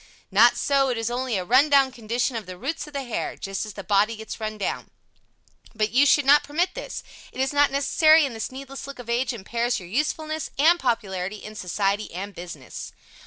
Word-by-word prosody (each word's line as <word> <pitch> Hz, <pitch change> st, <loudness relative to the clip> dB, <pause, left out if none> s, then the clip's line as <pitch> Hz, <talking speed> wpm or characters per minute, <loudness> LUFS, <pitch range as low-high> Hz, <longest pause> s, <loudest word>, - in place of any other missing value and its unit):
Not 225 Hz, +5 st, +6 dB
so, 275 Hz, -1 st, +2 dB
it 245 Hz, -, -1 dB
is 225 Hz, +1 st, -2 dB
only 250 Hz, -2 st, -1 dB
a 185 Hz, -, -3 dB
run 260 Hz, +8 st, +5 dB
down 275 Hz, -2 st, +5 dB
condition 240 Hz, +1 st, -2 dB
of 220 Hz, -5 st, -5 dB
the 185 Hz, -1 st, -8 dB
roots 295 Hz, -, -4 dB
of 300 Hz, -, -13 dB
the 280 Hz, -1 st, -3 dB
hair 240 Hz, -3 st, -4 dB
just 195 Hz, +2 st, -4 dB
as 210 Hz, -, -8 dB
the 200 Hz, -, -8 dB
body 205 Hz, +4 st, +2 dB
gets 220 Hz, +1 st, -8 dB
run 215 Hz, -1 st, -4 dB
down. 200 Hz, -, -3 dB, 0.9 s
But 215 Hz, -1 st, 0 dB
you 275 Hz, +4 st, +5 dB
should 290 Hz, 0 st, +4 dB
not 290 Hz, +2 st, +6 dB
permit 335 Hz, +6 st, -1 dB
this. -, -, -6 dB, 0.3 s
It -, -, -10 dB
is 265 Hz, +2 st, 0 dB
not 290 Hz, 0 st, +4 dB
necessary 310 Hz, +3 st, +4 dB
and 260 Hz, -4 st, -5 dB
this 220 Hz, -, -4 dB
needless 275 Hz, +1 st, -8 dB
look 280 Hz, -, -8 dB
of 240 Hz, -2 st, -6 dB
age 245 Hz, +2 st, +1 dB
impairs 235 Hz, +2 st, -2 dB
your 180 Hz, -, -10 dB
usefulness 310 Hz, -, -2 dB
and 330 Hz, +5 st, +5 dB
popularity 200 Hz, -, -1 dB
in 215 Hz, -, -8 dB
society 200 Hz, +1 st, -1 dB
and 200 Hz, +3 st, -5 dB
business. 170 Hz, -8 st, -8 dB
240 Hz, 215 wpm, -24 LUFS, 210-280 Hz, 0.9 s, Not